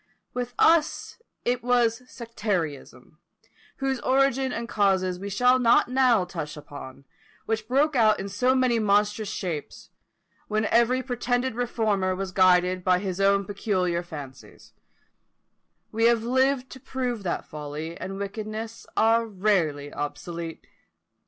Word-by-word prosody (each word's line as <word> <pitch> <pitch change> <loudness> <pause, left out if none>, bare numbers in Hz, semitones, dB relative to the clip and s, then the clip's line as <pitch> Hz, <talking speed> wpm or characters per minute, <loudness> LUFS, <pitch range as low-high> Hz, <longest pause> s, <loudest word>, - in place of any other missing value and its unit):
With 245 -1 -4
us 330 +6 +2 0.2
it 245 0 0
was 240 -2 +2
sectarism, 180 - -4 0.6
whose 270 -2 -1
origin 265 +1 +2
and 235 0 -4
causes 190 -4 +1
we 200 +1 -5
shall 250 +6 +3
not 240 0 +4
now 250 -6 +3
touch 160 -4 -6
on, 145 -2 -10 0.4
which 220 -1 -2
broke 280 +4 +2
out 215 -3 +4
into 195 0 -6
so 250 +5 +2
many 255 -3 +2
monstrous 210 0 +1
shapes, 165 -6 -5 0.6
when 215 +1 0
every 235 +3 +2
pretended 245 0 -1
reformer 215 -6 0
was 190 0 -4
guided 185 -1 +3
by 185 0 +3
his 190 0 -3
own 200 0 +3
peculiar 185 -3 -1
fancies: 145 -6 -11 1.2
we 225 +1 +1
have 235 -1 +4
lived 260 +1 +1
to 260 - -10
prove 250 -3 -3
that 180 -3 -3
folly 150 +2 -6
and 190 +3 -6
wickedness 215 +3 -6
are 230 +1 +3
rarely 180 -9 0
obsolete. 165 +3 -6
215 Hz, 130 wpm, -25 LUFS, 180-245 Hz, 1.2 s, not